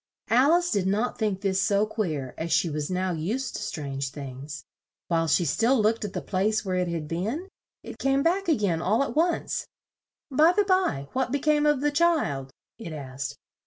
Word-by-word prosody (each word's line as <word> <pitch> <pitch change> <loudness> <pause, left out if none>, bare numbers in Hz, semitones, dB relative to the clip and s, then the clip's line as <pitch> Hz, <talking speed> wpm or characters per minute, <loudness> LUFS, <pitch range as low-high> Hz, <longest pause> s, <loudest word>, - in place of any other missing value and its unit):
Al 260 +7 +5
ice 350 0 +2
did 200 -4 +1
not 210 +6 0
think 205 -4 0
this 195 -1 +1
so 205 0 +2
queer 160 - -3
as 165 +1 -4
she 170 0 +2
was 150 0 -3
now 185 0 0
used 205 +12 -2
to - - -4
strange 140 -3 -4
things. 140 +1 -8 0.4
While 165 -1 +2
she 170 +3 +3
still 230 - +2
looked 220 +2 +2
at 205 -2 -4
the - - -4
place 210 +3 0
where 185 -1 -1
it 180 -1 0
had 165 -3 -3
been, 215 - -3 0.4
it - - -9
came 270 +1 +2
back 365 +3 +1
a 320 - +4
gain, 185 -8 0
all 215 +9 +2
at 280 - -5
once. 335 +3 0 0.6
"By 310 +6 +5
the 415 - +3
by, 370 - +1
what 260 -1 0
be 285 - +2
came 300 +1 +2
of 295 -3 +2
the 295 0 +2
child?" 290 - +1 0.3
it 170 -8 -7
asked. 135 -2 -6
200 Hz, 200 wpm, -26 LUFS, -, 0.6 s, Al